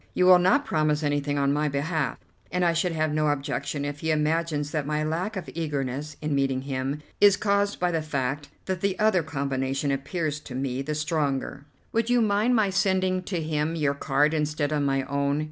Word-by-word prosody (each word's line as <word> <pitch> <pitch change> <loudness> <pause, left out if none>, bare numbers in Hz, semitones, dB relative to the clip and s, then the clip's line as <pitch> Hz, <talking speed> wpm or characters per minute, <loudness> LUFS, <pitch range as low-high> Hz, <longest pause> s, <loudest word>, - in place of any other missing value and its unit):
You 180 - +3
will 180 -1 +8
not 190 +11 +3
promise 155 - +1
anything 145 0 0
on 140 0 +2
my 150 +1 +1
behalf, 145 +1 -1 0.3
and 180 0 +1
I 170 - +3
should 170 +1 0
have 155 -1 0
no 155 0 +1
objection 145 0 -2
if 145 0 -4
he 160 - -2
imagines 155 -1 0
that 150 -3 -2
my 150 0 0
lack 175 +7 -2
of 180 - -5
eagerness 145 -2 -3
in 150 -1 -1
meeting 135 -1 0
him 135 +2 -3 0.2
is 200 -1 +6
caused 200 0 +1
by 180 0 +1
the 165 -1 0
fact 145 -1 -3 0.2
that 185 -2 -3
the 200 -1 0
other 215 -4 +3
combination 140 -2 -2
appears 150 +2 -2
to 130 -4 -9
me 130 0 -2
the 150 +2 -3
stronger." 145 -2 -2 0.3
"Would 230 +1 0
you 245 0 +4
mind 220 +2 +2
my 210 -4 +2
sending 190 -1 +1
to 175 -4 -2
him 155 +1 -1
your 145 -3 +1
card 145 +2 +1
instead 150 -1 -1
of 150 -1 +1
my 135 -1 +1
own? 140 +1 0
150 Hz, 200 wpm, -26 LUFS, 140-175 Hz, 0.3 s, will